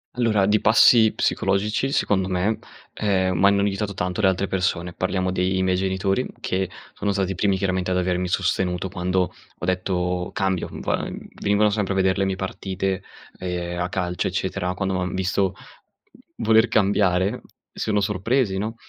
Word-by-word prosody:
Allora, 110 -5 +2
di 105 +1 +2
passi 110 0 +6
psicologici 105 +7 0
secondo 95 -8 +1
me, 95 +4 0 0.3
ehm, 95 -3 +1
m'hanno 100 +3 +4
aiutato 100 0 -1
tanto 90 +3 -2
le 100 - +4
altre 95 +1 +1
persone. 90 -2 -1
Parliamo 95 0 -1
dei 95 0 0
miei 95 0 +2
genitori, 95 +5 0
che 95 0 -1 0.2
sono 100 0 -1
stati 95 -1 0
i - - -3
primi 95 +1 +1
chiaramente 95 -1 -1
ad 90 - +1
avermi 90 0 0
sostenuto 90 0 0
quando 90 0 -1 0.2
ho - - -5
detto: 90 -1 -1
"Cambio"; 95 -2 -1
Vua - - -2 0.3
venivano 105 +1 +3
sempre 100 -2 -1
a - - -4
vedere 95 -1 +2
le 95 - +2
mie 95 0 -1
partite, 95 0 -3 0.4
ehm, 90 -1 -3
a 90 0 -1
calcio, 90 -1 -2
eccetera. 95 0 -2
Quando 95 0 -1
m'han 90 0 -2
visto 95 0 0 0.9
voler 110 +1 +5
cambiare, 100 0 +2 0.3
si - - -4
sono 105 -1 +2
sorpresi, 105 +1 0
no, 110 +3 -3
95 Hz, 160 wpm, -23 LUFS, 90-100 Hz, 0.9 s, passi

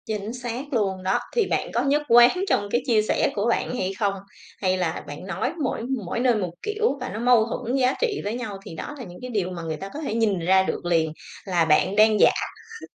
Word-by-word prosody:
Chính 215 +1 -4
xác 250 +3 -5
luôn 195 -5 0
đó. 190 +1 +1 0.2
Thì 460 -4 +3
bạn - - -1
có 240 - +1
nhất 285 +2 +2
quán 240 +11 +6
trong 205 - +1
cái 240 - +2
chia 225 -4 +4
sẻ 215 - +1
của 205 +2 0
bạn 245 - 0
hay 190 -5 -2
không? 200 -2 +1 0.5
Hay 185 -1 +1
là 175 -3 -2
bạn 145 +5 -8
nói 195 - -2
mỗi 255 - -1 0.2
mỗi 180 - -3
nơi 245 -1 +3
một 185 -5 -2
kiểu 425 -8 0
và 255 - -3
nó 205 - -5
mâu 240 -2 +4
thuẫn 245 +2 -3
giá 260 -1 +3
trị 465 -4 0
với 205 - -2
nhau, 220 -5 -5
thì - - -8
đó 295 - -6
là 255 - -7
những 180 -4 -11
cái 250 - -6
điều 200 -6 -1
mà 175 -2 -6
người 160 -1 -3
ta 195 +6 -7
có 295 - -5
thể 280 - -3
nhìn 220 -5 +1
ra 190 +3 +4
được 190 - -3
liền. 165 -3 +1 0.3
Là 175 -4 +2
bạn 165 +5 +3
đang 215 0 +5
giả - - +7 0.5
kh - - -10
215 Hz, 250 wpm, -24 LUFS, 185-250 Hz, 0.5 s, giả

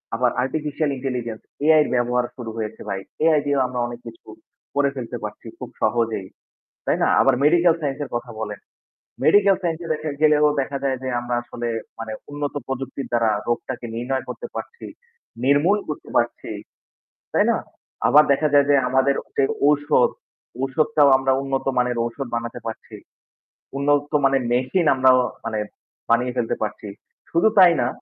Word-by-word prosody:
আবার 125 0 +2
artificial 150 +2 -2
intelligence 125 -4 -4 0.2
AI 155 0 +6
এর - - -4
ব্যবহার 120 0 +1
শুরু 120 -3 -6
হয়েছে 110 0 -5
ভাই। 100 -1 -2 0.2
এআই 160 -2 +5
দিয়েও 140 -1 +1
আমরা 125 0 -4
অনেক 120 0 -8
কিছু 115 0 -12 0.5
করে 140 -1 +3
ফেলতে 125 -3 -5
পারছি - - -7
খুব - - -7
সহজেই। 115 -5 0 0.6
তাই - - +1
না? - - +3
আবার 135 - +4
মেডিকেল 170 +3 +5
সাইন্স 140 -1 -2
এর - - -7
কথা 120 0 -4
বলেন। 105 -2 -5 0.7
মেডিকেল 200 -1 +5
সাইন্স 165 -2 -1
এ - - -6
দেখা 155 +1 -5
গেলেও 150 -1 +5
দেখা 140 +1 -3
যায় 135 -1 +1
যে 130 - -3
আমরা 120 0 -3
আসলে 120 0 -5 0.3
মানে 115 -1 -5 0.2
উন্নত 145 0 -4
প্রযুক্তির 135 +1 -5
দ্বারা 115 -2 +3 0.2
রোগটাকে 120 +1 -3
নির্ণয় 130 +3 -2
করতে 475 - -6
পারছি, 470 - -7 0.6
নির্মূল 145 +9 +4
করতে 150 - -6
পারছি। 120 0 0 0.8
তাই - - +3
না? - - +1 0.5
আবার 150 +1 +7
দেখা 155 +2 +1
যায় 145 -1 +6
যে 145 - +6
আমাদের 130 +2 +3 0.2
যে - - +4 0.2
ঔষধ, 145 -4 +3 0.5
ঔষুধটাও 145 +2 +3
আমরা 135 0 0
উন্নত 135 -1 -2
মানের 125 -1 +1
ঔষধ 120 +3 -5
বানাতে 115 +1 -4
পারছি। 110 - -8 0.8
উন্নত 145 +1 +1
মানের 135 -1 +3
মেশিন 130 +9 +1
আমরা 130 0 +4
অ - - +4 0.2
মানে 110 -2 -2 0.5
বানিয়ে 125 +2 +2
ফেলতে 120 -2 0
পারছি। 105 0 -4 0.4
শুধু 170 +6 +3
তাই 180 -2 +9
না 120 - +1
135 Hz, 165 wpm, -22 LUFS, 120-145 Hz, 0.8 s, তাই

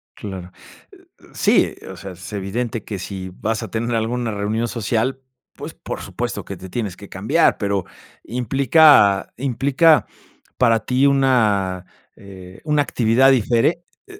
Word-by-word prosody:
Claro. 95 -3 -8 0.8
Sí, - - +2 0.2
o - - -9
sea, 95 -1 -8
es 90 +4 -11
evidente 105 +3 -3
que 100 -3 -5
si 95 -1 -6
vas 110 0 -1
a - - -6
tener 120 +1 -2
alguna 115 +1 -1
reunión 105 +3 -2
social, 120 +3 -1 0.3
pues, - - -8
por - - -7
supuesto - - -4
que - - -7
te 95 - -10
tienes 100 -3 -4
que 100 - -12
cambiar, 105 - +2
pero, 100 -3 -1 0.4
implica 125 -3 +4
implica 140 +5 +3 0.5
para 115 -3 +3
ti 130 +2 +2
una, 105 -10 +2 0.3
eh, 95 -2 -13
una 150 -1 +2
actividad 125 0 +3
difere 125 +7 +2 0.2
eh 400 - -13
115 Hz, 140 wpm, -20 LUFS, 100-130 Hz, 0.8 s, implica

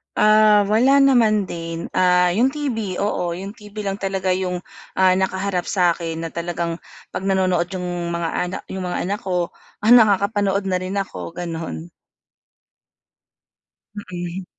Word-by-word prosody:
Ah, 215 0 +5
wala 260 +6 +5
naman 225 -7 +3
din, 165 0 -5
ah, 180 -1 +3
yung 240 +9 +2
TV, 225 -11 -3
oo, 180 -4 -1
yung 190 +3 -6
TV 210 -1 -13
lang 195 -1 -3
talaga 190 -1 -2
yung, 180 -1 -1 0.3
ah, 185 -1 +4
nakaharap 190 -1 -1
sa 180 -3 +2
akin 165 -1 -3
na 165 - -4
talagang 170 0 -3 0.3
'pag 190 - -5
nanonood 185 -3 +2
yung 175 -2 -3
mga 170 -1 -1
ana 180 +3 -2
yung 190 -1 -4
mga 180 - -2
anak 205 +1 -1
ko, 180 -2 -1 0.3
ah, 215 - +1
nakakapanood 200 -3 +4
na 185 - +1
rin 185 +1 -5
ako, 190 -3 -7
ganun. 165 - -5 2.2
Mm. 175 +1 -5
185 Hz, 145 wpm, -21 LUFS, 175-205 Hz, 2.2 s, Ah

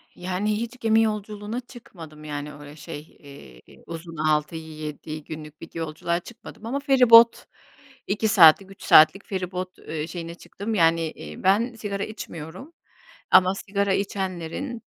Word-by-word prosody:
Yani, 185 +4 -2
hiç 235 +2 -6
gemi 225 -1 +3
yolculuğuna 210 +1 -3
çıkmadım. 170 - -13
Yani, 150 0 -6
öyle 145 0 -12
şey, 155 -1 -8 0.2
eee, 140 - -15
uzun, 165 0 -8
6-7 155 0 -3
günlük 155 -1 -10
bir 165 - -9
yolculuğa 165 +1 -2
çıkmadım 225 +2 -13
ama 260 +5 -2
feribot 250 -5 +6 0.6
2 210 +2 0
saatlik, 190 -1 +6
3 195 - -14
saatlik 160 +6 +6
feribot, 185 -2 -5
eee, 155 0 -5
şeyine 170 -1 -7
çıktım. 210 +5 -6
Yani, 165 -2 +3
eee, 75 0 -10
ben, 215 +6 +3
sigara 205 -3 -4
içmiyorum 185 - -8 0.6
ama 185 +1 +6
sigara 200 0 -1
içenlerin 195 - -3
185 Hz, 130 wpm, -24 LUFS, 155-215 Hz, 0.6 s, feribot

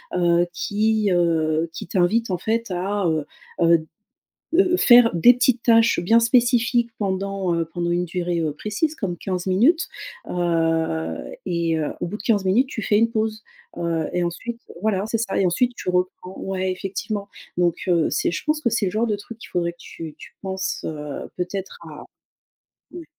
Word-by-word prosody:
heu, 175 -1 +3
qui, 215 +3 +1
heu, 165 -2 +2
qui - - -7
t'invite 195 +6 +1
en 180 - 0
fait 225 +5 -1
à, 195 +2 -1
heu 155 -2 0 0.4
heu 170 0 +6
d 160 - -13 0.7
heu, 360 0 +4
faire 240 -2 +7
des 240 +9 +7
petites 250 -1 +2
tâches 230 -3 +4
bien 225 +7 +4
spécifiques. 240 0 +3
Pendant, 195 -2 -1
heu, 165 0 0
pendant 170 +1 -3
une 175 +1 +1
durée, 175 0 -2
heu, 155 -2 -1
précise 215 - -2
comme 185 - -3
15 180 +1 -4
minutes. 255 - +3 0.4
Heu 165 - -1
et 170 -2 0
heu, 150 - -2
au - - -1
bout 180 - -4
de - - -9
15 210 -3 +1
minutes, 225 +8 +3
tu 240 -5 -5
fais 205 - +2
une 230 +1 +3
pause, 220 -1 -2 0.4
heu, 165 -2 -1
et 180 - 0
ensuite, 230 +8 -5 0.2
voilà, 205 -3 +1
c'est 225 +1 -1
ça 220 -3 -1
et - - +3
ensuite 245 +8 +1
tu - - -6
reprends 180 +1 -2
ouais, 190 -1 -2
effectivement. 200 +2 -4 0.3
Donc, 175 -2 +2
heu, 170 -2 +3
c'est - - +1
je 170 - -4
pense 305 0 +1
que 240 - +1
c'est 225 -2 +1
le - - 0
genre 225 +2 +1
de 215 -2 0
truc 220 +3 -11
qu'il - - -12
faudrait 170 -1 -1
que 170 - -28
tu 160 -2 -9
tu - - -12
penses, 190 0 -3
heu, 150 -2 -5
peut-être 185 - -4
à - - -10 0.9
ouais. 345 -1 -9
190 Hz, 190 wpm, -22 LUFS, 170-225 Hz, 0.9 s, faire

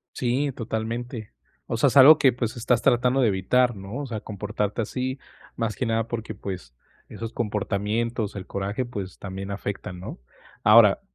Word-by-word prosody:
Sí, 130 +3 0
totalmente. 115 -1 -4 0.4
O 115 - -2
sea, 140 - +4
es 135 - +2
algo 140 +3 +10
que, 135 -4 +4
pues, 120 -1 -3
estás 120 +1 +1
tratando 125 +2 +3
de 120 - +4
evitar, 120 +5 +2
¿no? 100 +4 -7
O 145 - -4
sea, 110 -4 -5
comportarte 105 +1 -3
así, 130 +4 -3 0.4
más 115 -2 -2
que 130 - -2
nada 115 -1 0
porque, 115 -2 -4
pues, 95 -10 -7 0.3
esos 115 0 -7
comportamientos, 105 +1 -2
el 95 -2 -7
coraje, 100 +6 -3
pues, 100 -6 -7
también 95 0 -6
afectan, 95 -2 -5
¿no? 90 - -8 0.4
Ahora, 105 -1 +7
115 Hz, 165 wpm, -25 LUFS, 100-125 Hz, 0.4 s, algo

